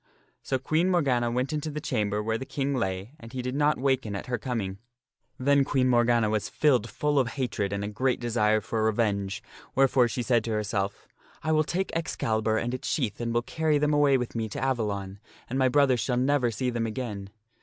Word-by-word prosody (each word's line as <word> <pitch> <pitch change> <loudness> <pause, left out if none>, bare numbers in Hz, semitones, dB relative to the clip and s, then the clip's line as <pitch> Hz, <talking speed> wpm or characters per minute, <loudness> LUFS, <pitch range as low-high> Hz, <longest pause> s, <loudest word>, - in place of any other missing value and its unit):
So 130 - -1
Queen 155 +7 +1
Morgana 135 -9 +2
went 125 +4 -1
into 155 0 -2
the 150 0 -4
chamber 105 -9 -1
where 110 +1 -1
the - - -4
King 140 +1 -2
lay 95 -2 -2
and 115 0 -11
he 130 -1 -3
did 125 0 -3
not 150 +2 +2
waken 130 -6 0
at 100 - -5
her 120 -2 -2
coming. 110 -6 -3 0.6
Then 140 +2 +3
Queen 130 -2 +1
Morgana 120 -2 +3
was 105 -1 -1
filled 125 -7 +2
full 150 -1 +1
of 130 - +2
hatred 120 -7 -2
and 100 0 -2
a - - -2
great 125 +5 0
desire 110 -3 +2
for 110 +1 -2
revenge, 105 -3 0 0.3
wherefore 135 -2 +4
she 120 +1 -3
said 120 -1 +2
to 115 - -2
herself, 100 -2 -2 0.2
" - - -28
I 160 - 0
will 155 0 +4
take 185 +4 -2
Excalibur 110 -9 0
and 120 +2 -2
his 130 - -4
shield 120 -7 -1
and 115 0 -1
will 120 0 +1
carry 155 +2 +1
them 150 +1 +1
away 145 -2 +4
with 125 -2 -4
me 110 -1 -2
to - - -5
Avalon, 100 -7 -2 0.3
and 130 +3 -2
my 130 -1 +4
brother 140 -2 +4
shall 125 +1 -1
never 130 -1 +2
see 125 +2 -2
them 115 -1 -1
again." 105 -4 -5
120 Hz, 215 wpm, -27 LUFS, 110-135 Hz, 0.6 s, wherefore